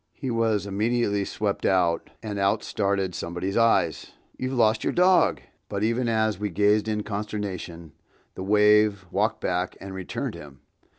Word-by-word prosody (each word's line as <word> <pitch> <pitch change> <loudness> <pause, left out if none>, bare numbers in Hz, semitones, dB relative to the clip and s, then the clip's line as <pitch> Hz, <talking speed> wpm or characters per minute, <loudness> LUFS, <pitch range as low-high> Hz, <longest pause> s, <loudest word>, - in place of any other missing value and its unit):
He 130 -3 -4
was 110 -4 +1
immediately 105 0 0
swept 105 0 -2
out, 90 -3 +1
and 105 -2 -4
out 100 +2 +1
started 100 -2 -1
somebody's 90 +4 -4
eyes! 115 -9 +2 0.2
"You've 130 0 -3
lost 110 -3 +2
your - - 0
dog!" 180 +1 +4 0.3
But 100 0 -2
even 115 +2 +1
as 110 -3 +1
we 105 0 -2
gazed 105 +3 +2
in 105 -1 -1
consternation, 100 -6 -5 0.4
the - - -8
wave—walked 105 -1 +3
back 90 0 -2
and 95 0 -8
returned 95 -1 -4
him! 70 -2 -12
105 Hz, 150 wpm, -25 LUFS, 95-110 Hz, 0.4 s, dog